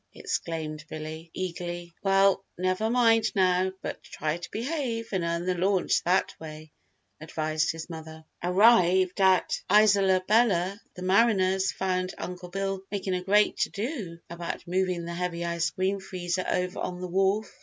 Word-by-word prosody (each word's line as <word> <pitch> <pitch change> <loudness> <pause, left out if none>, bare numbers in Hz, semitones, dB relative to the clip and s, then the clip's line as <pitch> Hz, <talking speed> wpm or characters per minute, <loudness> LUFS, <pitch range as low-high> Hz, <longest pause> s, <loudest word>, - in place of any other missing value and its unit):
exclaimed 155 -2 -4
Billy, 155 +1 -7
eagerly. 175 -1 -5
"Well, 195 0 +3
never 185 +4 0
mind 225 -2 +3
now, 185 -1 +3
but - - -5
try 155 +1 -3
to 175 +1 -8
behave 235 -2 -3
and 190 -4 -1
earn 170 +1 -1
the 185 - +1
launch 185 +1 +1
that 185 +2 +2
way," 155 -1 -9 0.5
advised 155 0 -1
his 165 0 -7
mother. 160 -1 -9 0.2
Arrived 185 -1 +4
at 190 -1 +3
Isola 200 -3 +5
Bella 200 -3 +2
the 180 - -7
mariners 190 -1 +3
found 185 -1 -2
Uncle 180 0 -7
Bill 195 +1 -2
making 195 -2 -2
a 180 - -1
great 205 +3 +3
to - - +1
do 205 - -4
about 170 0 -6
moving 180 -1 0
the 170 - -5
heavy 170 -1 -3
ice 170 -1 0
cream 190 +4 -1
freezer 185 -1 -3
over 180 0 -1
on 180 -1 -4
the 180 - -4
wharf. 195 +4 +1
185 Hz, 155 wpm, -27 LUFS, 170-195 Hz, 0.5 s, Isola